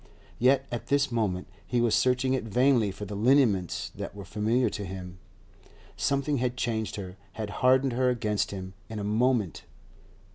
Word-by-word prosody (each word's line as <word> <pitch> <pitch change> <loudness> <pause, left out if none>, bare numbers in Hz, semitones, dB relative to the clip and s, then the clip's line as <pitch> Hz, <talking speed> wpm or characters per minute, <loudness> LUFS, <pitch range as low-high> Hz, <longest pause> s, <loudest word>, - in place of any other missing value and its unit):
yet 130 +2 +4
at 120 - -4
this 140 -1 +2
moment 100 -6 -1 0.2
he 125 - -1
was 120 -2 +2
searching 130 +1 +2
it 130 - 0
vainly 120 0 +3
for 100 +2 -6
the 105 - -7
lineaments 110 - +2
that - - -6
were 100 -2 -8
familiar 110 +6 +1
to 105 -1 -4
him. 90 -1 -7 0.8
Something 140 +1 0
had 125 0 -1
changed 110 -3 -1
her, 95 -2 -7 0.2
had 105 -1 -5
hardened 130 0 +4
her 125 +1 +2
against 110 -4 0
him, 95 -1 -6 0.2
in 110 - -6
a 105 - -3
moment. 110 -2 +1
115 Hz, 170 wpm, -28 LUFS, 100-130 Hz, 0.8 s, yet